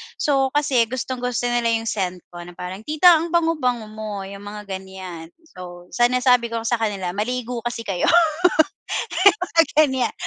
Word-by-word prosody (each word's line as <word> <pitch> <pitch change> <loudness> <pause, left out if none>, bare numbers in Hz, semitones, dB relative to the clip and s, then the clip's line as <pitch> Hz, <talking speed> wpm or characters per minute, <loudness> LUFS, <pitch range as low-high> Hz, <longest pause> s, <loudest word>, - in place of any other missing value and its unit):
So 275 -2 +1
kasi 260 -6 +2
gustong-gusto 250 -1 -3
nila 240 -1 +1
yung 225 0 -4
scent 185 -3 -3
ko 175 - -10
na 175 0 -12
parang 180 +2 -7
tita 310 +4 +6
ang 335 - -3
bango 330 -2 +1
bango 240 -4 -1
mo 215 -2 -6
yung 200 +1 -9
mga 210 0 -8
ganyan 190 -3 -8 0.2
so 180 - -12
sa 240 - +3
nasabi 250 -1 +3
ko 230 0 -4
sa 235 0 0
kanila 200 -5 -2
maligo 240 +4 -3
kasi 230 -1 -4
kayo 195 -5 -1 1.4
mga 335 -2 +3 0.2
ganyan, 265 -3 -1
230 Hz, 165 wpm, -22 LUFS, 190-250 Hz, 1.4 s, tita